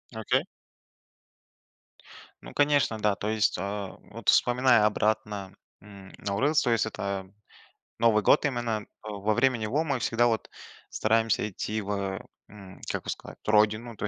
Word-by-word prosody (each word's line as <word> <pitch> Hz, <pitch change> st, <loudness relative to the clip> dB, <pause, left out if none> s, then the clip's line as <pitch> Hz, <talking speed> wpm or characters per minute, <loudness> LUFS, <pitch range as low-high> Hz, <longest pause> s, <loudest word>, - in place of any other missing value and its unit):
Окей. 110 Hz, -1 st, +1 dB, 2.0 s
Ну -, -, -11 dB
конечно, 145 Hz, -6 st, +2 dB
да, 105 Hz, -1 st, +2 dB
то 100 Hz, +3 st, -3 dB
есть, 110 Hz, -1 st, +1 dB
а, 100 Hz, 0 st, -4 dB
вот -, -, -2 dB
вспоминая 125 Hz, -3 st, +4 dB
обратно, 105 Hz, -2 st, -1 dB, 0.3 s
м, 100 Hz, -1 st, -13 dB
Наурыз, 120 Hz, +10 st, +1 dB
то 125 Hz, -, 0 dB
есть 115 Hz, -, +2 dB
это, 100 Hz, -3 st, -4 dB, 0.7 s
новый 110 Hz, -3 st, +4 dB
год -, -, +5 dB
именно, 120 Hz, -6 st, -1 dB, 0.2 s
а, 110 Hz, -, -7 dB
во 105 Hz, +1 st, 0 dB
время 130 Hz, 0 st, +3 dB
него 120 Hz, +8 st, -1 dB
мы 140 Hz, -5 st, -1 dB
всегда, 115 Hz, +1 st, +2 dB
вот, 115 Hz, -2 st, -1 dB, 0.4 s
стараемся 110 Hz, -1 st, +1 dB
идти 110 Hz, +3 st, -3 dB
в, 100 Hz, -, -8 dB
э, 100 Hz, -1 st, -2 dB, 0.3 s
м, 100 Hz, -3 st, -13 dB
как -, -, -3 dB
бы -, -, -8 dB
сказать, -, -, -6 dB
родину, 110 Hz, +2 st, +2 dB
то -, -, -4 dB
е -, -, 0 dB
110 Hz, 155 wpm, -27 LUFS, 100-115 Hz, 2.0 s, год